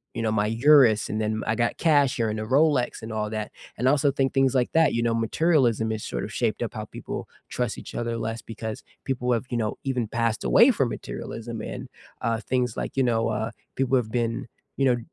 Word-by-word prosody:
you 115 - -2
know, 110 -1 0
"my 105 -1 +1
Urus," 115 -1 +5
and 110 - -2
then, 110 0 -1
"I 110 - +1
got 120 -1 0
cash 145 -5 +3
here 115 -2 +1
and 110 0 -3
a - - -3
Rolex," 135 +1 +2
and 110 0 -7
all 105 -1 -2
that. 110 -1 -4 0.3
And 125 - +2
also 140 0 +4
think 135 -1 0
things 135 -1 +3
like 125 -1 +2
that, 160 -1 +4
you 115 - +1
know, 115 -1 +1
materialism 115 -2 +2
has 110 -1 -3
sort - - -3
of - - -5
shaped - - -1
up - - -4
how - - -4
people - - -7 0.2
trust 125 -3 -2
each - - -10
other 115 -1 -2
less 115 0 -3
because 110 -1 -6 0.2
people 125 -2 -1
have, 115 +2 -1
you 120 - -1
know, 110 -2 -2
even 125 -4 -1
passed 115 0 -1
away - - +6
from - - 0
materialism 115 -1 -6
and, - - -6 0.3
uh, 115 0 0
things 125 -3 -1
like, - - -4
you - - +4
know, 115 -2 +1
uh, 110 +1 -1 0.3
people 135 0 +2
have 110 -3 -2
been, 115 -1 -1 0.3
you 135 - +2
know, 125 -2 +4
115 Hz, 230 wpm, -25 LUFS, 110-130 Hz, 0.3 s, away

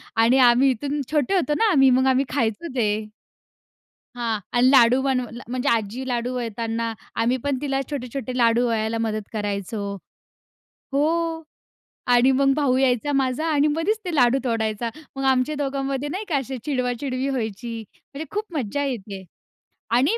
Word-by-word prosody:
आणि 230 +4 +4
आम्ही 250 +2 +6
इथून 285 +4 -2
छोटे 300 +5 +1
होतो 335 -5 +1
ना 450 -2 +3
आम्ही 270 -5 +5
मग 260 +1 +3
आम्ही 265 +1 +3
खायचो 235 +4 -1
ते. 215 -3 0 1.1
हां 230 -3 -1 0.2
आणि 250 +1 +5
लाडू 255 -1 +6
बनवला 255 -3 -2
म्हणजे 255 0 -1
आजी 230 +3 -1
लाडू 245 0 -1
वळताना 230 -1 -3 0.3
आम्ही 245 +3 +2
पण 285 -2 0
तिला 275 -2 -1
छोटे-छोटे 255 -2 -4
लाडू 235 0 +3
वळायला 225 0 -1
मदत 215 -1 -4
करायचो 205 0 -3 1.1
हो 325 +3 0 0.7
आणि 245 +2 +5
मग 275 +1 +3
भाऊ 280 -4 +2
यायचा 265 +1 +1
माझा 270 +2 0
आणि 295 0 +3
मधीच 330 +9 0
ते 355 - -3
लाडू 250 -1 +4
तोडायचा. 225 -1 -1 0.3
मग 270 - -4
आमच्या 265 +3 +2
दोघांमध्ये 275 0 -2
नाही 385 +7 -4
का 315 - +1
अशी 265 0 -4
चिडवाचिडवी 255 -1 -2
व्हायची, 230 -2 -3 0.3
म्हणजे 295 +3 -5
खूप 420 +1 -2
मज्जा 280 +2 -2
येते. 205 -8 -5 0.7
आणि 270 - +3
255 Hz, 150 wpm, -23 LUFS, 230-280 Hz, 1.1 s, आम्ही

